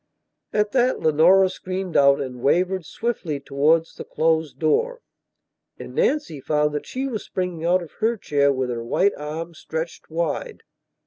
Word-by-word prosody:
At 210 0 +1
that 255 -1 +2
Leonora 170 +5 +5
screamed 185 -1 -5
out 140 0 +5
and 125 -3 -5
wavered 180 +5 +1
swiftly 185 -11 -3
towards 150 +4 +1
the - - -8
closed 160 -2 0
door. 485 - +1 0.8
And - - -9
Nancy 295 - 0
found 150 +1 +1
that 150 - -4
she 260 +1 -3
was 230 -6 -4
springing 180 -3 -4
out 180 +1 +3
of 165 - -12
her 225 +1 +1
chair 140 -6 +2
with 130 -2 -1
her 115 -1 -4
white 195 +12 +2
arms 160 +3 -6
stretched 160 +1 -5
wide. 160 -2 -3
165 Hz, 155 wpm, -23 LUFS, 150-190 Hz, 0.8 s, Leonora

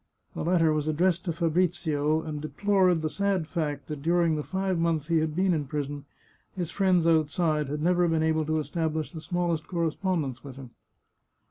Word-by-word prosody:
The - - -4
letter 165 -2 +3
was 155 0 -1
addressed 170 +3 +1
to 175 - 0
Fabrizio, 160 -2 0
and 150 -2 -5
deplored 185 0 +2
the - - +1
sad 200 -4 0
fact 150 -4 -3
that 150 -1 -6
during 170 0 +2
the 150 - -2
five 190 +2 -2
months 165 -2 0
he 165 -1 +3
had 155 -1 -1
been 185 +1 +2
in 150 -4 -2
prison 145 0 -4 0.5
his 175 -4 -3
friends 185 -4 +2
outside 155 -2 +2
had 150 +1 -3
never 175 0 +3
been 160 -1 +1
able 160 -1 +1
to 155 0 +1
establish 160 0 -2
the 160 -3 -8
smallest 170 -1 -1
correspondence 165 -6 -2
with 135 -3 -9
him. 135 -3 -11
160 Hz, 185 wpm, -27 LUFS, 150-175 Hz, 0.5 s, letter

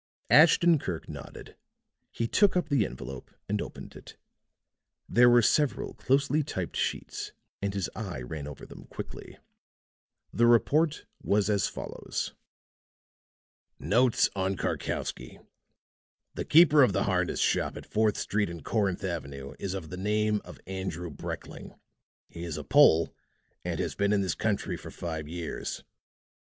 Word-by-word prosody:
Ashton 165 +1 +6
Kirk 85 -10 -5
nodded. - - -10 0.5
He 115 - -2
took 200 - +3
up 175 - -1
the 140 -7 +2
envelope 65 +1 -8 0.2
and 105 +1 -1
opened - - -8
it. - - -13 0.9
There 120 +1 +6
were 120 -1 +6
several 150 +4 +1
closely 140 +3 +1
typed 95 - -4
sheets - - -3 0.3
and 100 0 -1
his 95 -3 -1
eye 90 - -5
ran 75 +2 -6
over 75 - -9
them - - -12
quickly. - - -9 1.0
The 120 +1 +4
report 150 +7 +3 0.2
was 105 0 +2
as 100 -2 +2
follows: - - -5 1.4
"Notes 120 +3 +3
on 95 0 -1
Karkowsky" 60 - -3 1.0
"The - - -4
keeper 155 -2 +7
of 125 -7 +5
the 100 - +1
harness 90 -2 0
shop - - +1
at - - -9
Fourth 110 -1 +1
Street 105 -2 0
and 85 -3 -8
Corinth 100 -3 0
Avenue 70 -7 -5
is 95 -1 -3
of 85 -5 -6
the 90 - -5
name 105 +2 +1
of - - -12
Andrew 95 -3 -4
Brekling. - - -7 0.5
He 85 - -9
is 80 -3 -4
a 75 - -5
Pole 80 +3 +5 0.5
and - - -3
has - - -1
been 100 +1 +1
in 100 - +2
this 95 -4 0
country - - -1
for - - -10
five 80 -3 -5
years. 85 0 -5
100 Hz, 145 wpm, -28 LUFS, 85-120 Hz, 1.4 s, keeper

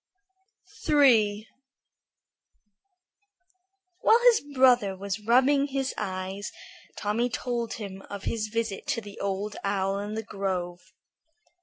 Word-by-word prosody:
III 220 -8 +4 2.5
While 450 - +5
his 450 - 0
brother 245 -7 +4
was 200 +2 -4
rubbing 260 +6 +3
his 270 -1 -2
eyes 190 0 -4 0.5
Tommy 225 +4 0
told 235 -1 -3
him 195 -3 -7
of 200 -1 -7
his 220 -2 -2
visit 225 +1 -3
to 280 -5 -1
the 205 -2 -11
Old 200 +1 -3
Owl 195 0 0
in 205 +1 -5
the 220 - -3
grove. 185 -4 -3
210 Hz, 110 wpm, -27 LUFS, 195-245 Hz, 2.5 s, While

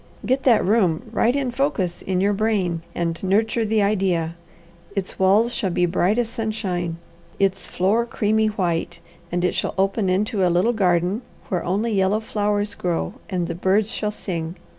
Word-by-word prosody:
Get 260 +2 +1
that 235 -5 +5
room 190 -5 +2
right 235 +2 +2
in 270 -3 0
focus 235 - -1
in 185 -1 -1
your 200 +1 +3
brain, 195 -5 0
and 170 -1 -2
nurture 220 +4 +2
the 215 -1 +2
idea. 185 -5 0 0.6
Its 195 0 -4
walls 205 +5 +4
shall 200 -7 -1
be 175 0 +2
bright 180 +4 +1
as 240 -2 +1
sunshine, 210 -7 -3 0.4
its 195 -2 0
floor 215 +6 +1
creamy 220 -1 +1
white, 180 -6 -1 0.3
and 175 +1 0
it - - +1
shall - - -2
open 195 +1 +1
into 195 +1 +1
a 180 - +4
little 180 +8 +2
garden, 180 0 +1 0.3
where 180 - -1
only 205 +6 0
yellow 195 +2 +2
flowers 205 -1 -1
grow, 175 +1 -2 0.2
and 180 -3 -1
the 170 - -3
birds 195 +5 +1
shall 210 - -2
sing. 170 -5 -4
195 Hz, 170 wpm, -22 LUFS, 180-220 Hz, 0.6 s, that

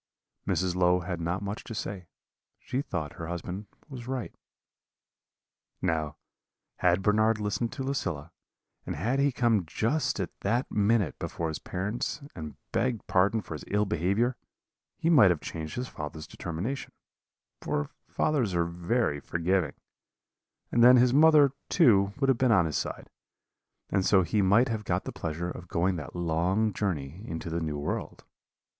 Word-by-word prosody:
"Mrs. 90 -1 +1
Low 90 0 +3
had 90 -1 -4
not 90 +4 -2
much 100 +2 -4
to 115 - -6
say; 95 -4 -5 0.5
she 130 - -3
thought 85 - -4
her 80 - -7
husband 90 +4 -5 0.2
was 125 -5 -8
right. 130 -2 -3 1.5
"Now, 80 -2 -1 0.6
had 90 +1 +2
Bernard 110 +2 +3
listened 105 +2 -1
to 135 - -4
Lucilla, 90 - -3 0.5
and - - -4
had 115 - 0
he 140 0 +3
come 120 -5 +2
just 115 - 0
at 95 - -2
that 120 +6 0
minute 105 0 +2
before 80 -1 -3
his 80 - -4
parents 105 +10 -3
and 80 -3 -7 0.2
begged 120 -2 0
pardon 100 +4 +2
for 85 - -7
his 75 - -6
ill 105 +1 +1
behaviour, 105 +6 +1 0.6
he - - -2
might 130 - +7
have 85 -3 +1
changed 80 0 -6
his 125 +1 -3
father's 75 -2 -7
determination 90 +11 -5 0.7
for 75 0 -2 0.2
fathers 130 - 0
are 85 -1 +2
very 85 0 0
forgiving 85 0 0 1.0
and 120 - +4
then 125 +1 +9
his 125 0 +4
mother, 150 -1 +7 0.2
too, 100 - +5
would 135 - +2
have 135 -3 +3
been 130 -2 +4
on 95 -6 +5
his 80 - -2
side; - - -4 0.8
and 95 -1 +2
so 95 -1 +5
he 100 +5 +1
might 105 +7 +5
have 110 -3 -2
got - - -1
the - - -5
pleasure 85 +3 -4
of 90 - -9
going 90 +2 +1
that 75 0 -7
long 90 +6 +1
journey 85 -4 -3
into 80 0 -5
the 85 +1 -1
New 75 -2 -2
World. 70 +1 -4
95 Hz, 160 wpm, -28 LUFS, 85-115 Hz, 1.5 s, then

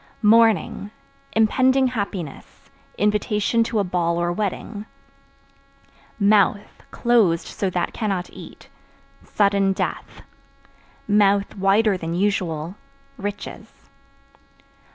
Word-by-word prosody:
Mourning 215 -2 +3 0.4
Impending 260 +4 +3
happiness, 200 - -6 0.3
invitation 210 +2 +1
to 230 - -2
a 205 - +2
ball 175 -2 -1
or 175 0 0
wedding. 205 +2 -4 1.3
Mouth 205 0 +2
(Closed 220 -9 +2
so 195 - -3
that 175 -1 -2
cannot 195 -5 -2
eat) - - -12 0.6
sudden 200 -1 +1
death; - - -5 0.8
(wider 200 0 +2
than 165 -1 -4
usual) 180 -3 -1 0.4
riches. 205 -2 -8
200 Hz, 85 wpm, -22 LUFS, 185-215 Hz, 1.3 s, Mourning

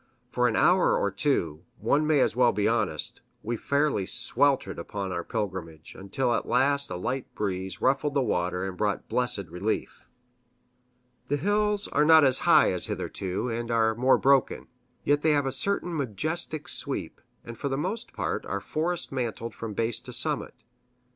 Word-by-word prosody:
For 125 -1 +2
an 110 - 0
hour 180 +1 +4
or 100 - 0
two 90 - -1
one 145 +8 +1
may 150 -3 +4
as - - +1
well 125 -1 +4
be 105 - 0
honest 110 -10 -1 0.2
we 120 +2 -2
fairly 140 -5 0
sweltered 135 +5 +1
upon 100 -2 -5
our 85 -1 -3
pilgrimage, 90 -8 -5
until 120 +6 -1
at - - -1
last 140 +3 +2
a - - -4
light 125 +9 -3
breeze 95 -1 -3
ruffled 140 +2 +1
the 140 - +3
water 90 -4 -1
and 95 - -6
brought 105 +1 -1
blessed 120 -6 -1
relief. 90 +6 -3 1.2
The 145 - 0
hills 205 +4 +1
are 150 - +2
not 160 0 +7
as 130 -2 +5
high - - +6
as - - -1
hitherto, 95 +6 -3
and 115 +1 -3
are 115 -1 +2
more 125 +4 +3
broken. 135 -1 +2 0.3
Yet 145 0 +2
they 155 0 +3
have 145 -1 +1
a 135 - -1
certain 175 +4 -1
majestic 155 - -2
sweep, - - -2 0.2
and 115 - -8
for 140 - -3
the 135 - -1
most 190 +10 -3
part - - -3
are - - -2
forest 170 +3 -3
mantled 115 -3 -3
from 110 -2 -6
base 115 +1 -1
to - - -10
summit. - - -1
125 Hz, 175 wpm, -27 LUFS, 100-145 Hz, 1.2 s, not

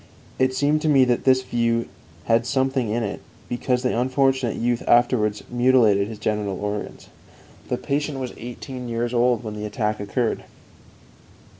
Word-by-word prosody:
It 130 0 +2
seemed 145 +3 +2
to 155 - +1
me 135 -3 +5
that 120 -1 0
this 130 -1 +4
view 115 -1 0 0.4
had 115 +1 +2
something 130 -3 0
in 115 +2 0
it, 105 - -4 0.3
because 125 +1 -1
the 125 - +1
unfortunate 130 0 +1
youth 120 0 0
afterwards 120 -3 +3
mutilated 120 -5 +3
his 110 -1 -7
genital 105 -2 -2
organs. 105 0 -5 0.6
The - - -1
patient 145 0 -2
was 130 -2 -4
eighteen 125 +1 -7
years 120 +1 -2
old 120 0 +2
when 110 -2 -5
the 105 0 -5
attack 105 0 -2
occurred. 110 +3 -2
120 Hz, 155 wpm, -23 LUFS, 110-130 Hz, 0.6 s, me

